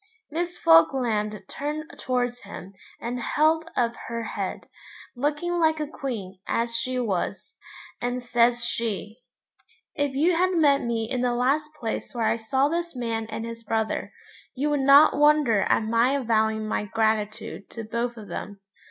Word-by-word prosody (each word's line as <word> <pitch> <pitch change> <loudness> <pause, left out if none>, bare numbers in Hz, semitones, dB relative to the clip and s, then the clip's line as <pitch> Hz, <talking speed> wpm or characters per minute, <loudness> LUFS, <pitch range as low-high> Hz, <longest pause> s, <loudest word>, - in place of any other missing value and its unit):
Miss 345 +3 -3
Falkland 210 +4 +3
turned 300 +2 -4
towards 245 -1 -1
him 195 +2 -10 0.3
and 245 +1 -4
held 320 +6 +1
up 235 -1 +1
her 230 0 -3
head, - - -4 0.5
looking 295 +7 -1
like 315 -1 +3
a 305 - -1
queen, 220 -10 -6
as 230 0 0
she 255 +1 -1
was, 210 -8 -2 0.5
and 245 0 -2
says 240 0 +2
she 220 -2 -3 0.7
'If 285 -3 -1
you 330 +5 +3
had 370 +2 +2
met 290 -4 +4
me 230 -2 -1
in 250 +1 -1
the 245 -1 +1
last 280 +5 +1
place 225 +2 -4
where 230 -2 0
I 225 - +2
saw 265 +5 +1
this 340 0 -2
man 230 -2 -2
and 225 +1 -5
his 230 0 -8
brother, 220 0 -1 0.4
you 290 +3 0
would 290 - +1
not 280 +3 +7
wonder 295 -8 +4
at - - +3
my 230 +4 +2
avowing 220 -4 +1
my 210 - -1
gratitude 215 -1 -1
to 230 - -7
both 235 +2 -3
of 210 -2 -9
them. 205 -1 -6
240 Hz, 160 wpm, -25 LUFS, 225-285 Hz, 0.7 s, not